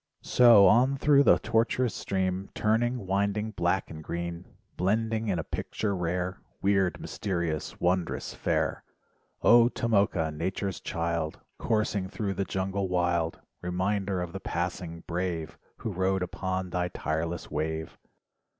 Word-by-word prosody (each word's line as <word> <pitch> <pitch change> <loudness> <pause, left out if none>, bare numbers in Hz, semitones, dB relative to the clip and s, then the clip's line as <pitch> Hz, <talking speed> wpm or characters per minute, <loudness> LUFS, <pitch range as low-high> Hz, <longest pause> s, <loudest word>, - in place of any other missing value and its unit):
So 115 -5 +7
on 130 +6 +5
thru 140 0 +5
the - - +6
tortuous 115 +1 +1
stream, 95 0 -2
Turning, 115 +1 +1
winding, 100 +3 0
black 90 0 0
and 80 -1 -8
green, 85 +2 -4 0.3
Blending 110 +4 0
in 95 -4 +1
a 80 - -2
picture 100 +5 -3
rare, 90 +1 -2 0.2
Wierd, 95 -2 +2
mysterious 85 -6 -3
wondrous 90 0 0
fair. - - -1 0.6
0 120 0 +7
Tomoka. 100 -8 +1
nature's 95 +3 -2
child, 85 -1 -2 0.2
Coursing 105 -4 0
thru 100 -1 -2
the 95 +1 -2
jungle 95 +1 -2
wild, 85 -2 0 0.2
Reminder 95 +1 -1
of 85 - -7
the 95 - -4
passing 85 -2 -3
"brave," 85 -2 -3 0.2
Who 110 - -4
rode 95 0 0
upon 95 0 -3
thy 90 0 0
tireless 80 0 -3
wave. 80 +1 -3
95 Hz, 130 wpm, -28 LUFS, 85-105 Hz, 0.6 s, So